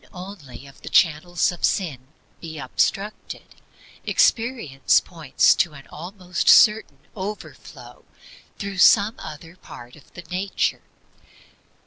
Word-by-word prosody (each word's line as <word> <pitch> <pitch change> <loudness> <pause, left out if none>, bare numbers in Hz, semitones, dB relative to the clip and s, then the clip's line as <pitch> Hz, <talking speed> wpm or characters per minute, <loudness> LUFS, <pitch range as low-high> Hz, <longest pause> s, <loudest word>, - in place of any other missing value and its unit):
If - - -23
only 180 -9 -10
one 140 - -14
of 140 - -18
the - - -8
channels 170 +2 +2
of 175 - -11
sin 140 - -1 0.3
be 160 -2 -9
obstructed, 195 +9 -3 0.5
experience 225 - +1
points 160 -6 +1
to 170 - 0
an 140 -1 -13
almost 180 +2 -3
certain 215 +1 +5 0.2
overflow 205 +1 -9 0.5
through 200 -2 -6
some 205 +3 +5
other 165 +3 -10
part 120 -8 -13
of 150 - -20
the 175 - -9
nature. 185 +3 -2
175 Hz, 120 wpm, -22 LUFS, 150-200 Hz, 0.5 s, certain